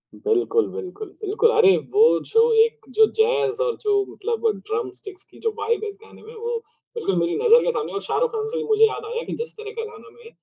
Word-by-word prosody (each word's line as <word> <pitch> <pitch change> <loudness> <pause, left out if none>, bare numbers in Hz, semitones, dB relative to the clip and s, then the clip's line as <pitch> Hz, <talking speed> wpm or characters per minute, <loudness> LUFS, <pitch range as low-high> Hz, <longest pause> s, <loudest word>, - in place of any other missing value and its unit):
बिल्कुल, 435 +1 +1
बिल्कुल, 425 0 -7
बिल्कुल। 430 +3 +2
अरे 435 -4 +5 0.2
वो 445 +3 +5
जो 455 +1 +4
एक 460 - -4
जो 440 - +8
जैज़ 450 0 +2
और 485 -2 -1
जो 405 -1 +2
मतलब 465 0 -4 0.2
ड्रम 435 -2 -2
स्टिक्स 390 -4 -12
की - - -17
जो 450 - +2
वाइब 460 0 -1
है 430 - -3
इस 405 - -11
गाने 440 - -16
में, 450 - -13
वो 465 +1 -3 0.4
बिल्कुल 325 - -1
मेरी 170 0 0
नज़र 470 +1 +5
के - - +1
सामने - - -3
है। - - -7
और 400 - -2
शाहरुख़ - - 0
खान 440 -1 -3
से 475 +2 -4
भी 460 - -2
मुझे 440 0 +4
याद 435 0 -6
आया 470 +1 -4
कि - - -5
जिस 470 - -6
तरह 435 -1 -8
का 450 - -3
गाना 430 - -14
मैं 470 -1 -16
445 Hz, 240 wpm, -22 LUFS, 425-465 Hz, 0.4 s, जो